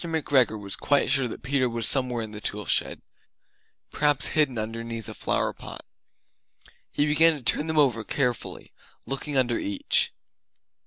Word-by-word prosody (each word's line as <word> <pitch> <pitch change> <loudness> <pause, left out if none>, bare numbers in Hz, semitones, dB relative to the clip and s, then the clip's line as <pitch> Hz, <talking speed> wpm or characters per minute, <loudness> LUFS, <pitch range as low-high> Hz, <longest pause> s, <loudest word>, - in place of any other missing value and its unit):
McGregor 140 -9 +1
was 100 -1 -4
quite 145 -2 +1
sure 135 -3 +3
that - - -9
Peter 130 -1 +1
was 115 -2 -1
somewhere 125 -3 +3
in 110 - -6
the 105 0 -8
tool 105 -1 -3
shed, - - 0 0.9
perhaps 145 -2 +2
hidden 145 -6 +1
underneath 115 0 -5
a - - -6
flower - - -1
pot. - - -9 1.0
He 145 - 0
began 160 +2 +4
to 140 - -10
turn 150 +6 0
them 160 -1 -2
over 130 -7 +3
carefully, 125 -1 -2 0.3
looking 135 +1 -3
under 120 -2 +1
each. 100 -1 0
125 Hz, 155 wpm, -26 LUFS, 115-145 Hz, 1.0 s, began